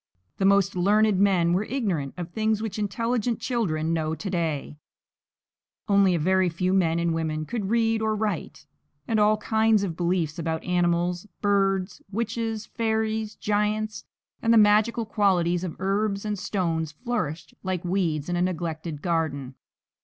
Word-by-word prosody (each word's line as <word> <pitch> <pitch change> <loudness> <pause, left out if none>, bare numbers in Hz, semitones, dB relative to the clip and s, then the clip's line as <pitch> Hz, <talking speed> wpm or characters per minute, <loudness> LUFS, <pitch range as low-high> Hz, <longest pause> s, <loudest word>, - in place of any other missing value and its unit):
The 195 - +1
most 200 0 +3
learned 205 +2 +3
men 180 -4 +3
were 185 +3 +1
ignorant 190 - -2
of 175 -1 -5
things 220 +1 0
which 220 -1 -4
intelligent 230 +3 -1
children 165 -10 -1
know 160 -1 -1
to 195 - -5
day; 160 -4 -2 1.1
only 200 -3 +4
a - - 0
very 185 +3 +2
few 180 +3 -1
men 170 -4 +2
and 170 -1 +1
women 155 -1 -2
could 205 0 -3
read 225 -1 +2
or 220 0 +1
write; 205 -8 -3 0.4
and 220 -2 +1
all 210 +1 +4
kinds 220 0 +2
of 175 -5 -3
beliefs 170 -2 -1
about 160 -1 -2
animals, 175 +1 0
birds, 195 -2 +1
witches, 225 0 -2
fairies, 220 -1 -1
giants, 210 +1 -1 0.4
and 230 - +2
the 230 - +6
magical 215 +2 +4
qualities 180 -5 +1
of 175 -4 -4
herbs 200 +1 0
and 210 -2 -2
stones 165 -6 -1
flourished 210 - -4
like 185 -2 -3
weeds 170 -5 0
in 175 - -1
a 175 - 0
neglected 165 -3 -3
garden. 155 -6 -1
195 Hz, 155 wpm, -25 LUFS, 170-215 Hz, 1.1 s, the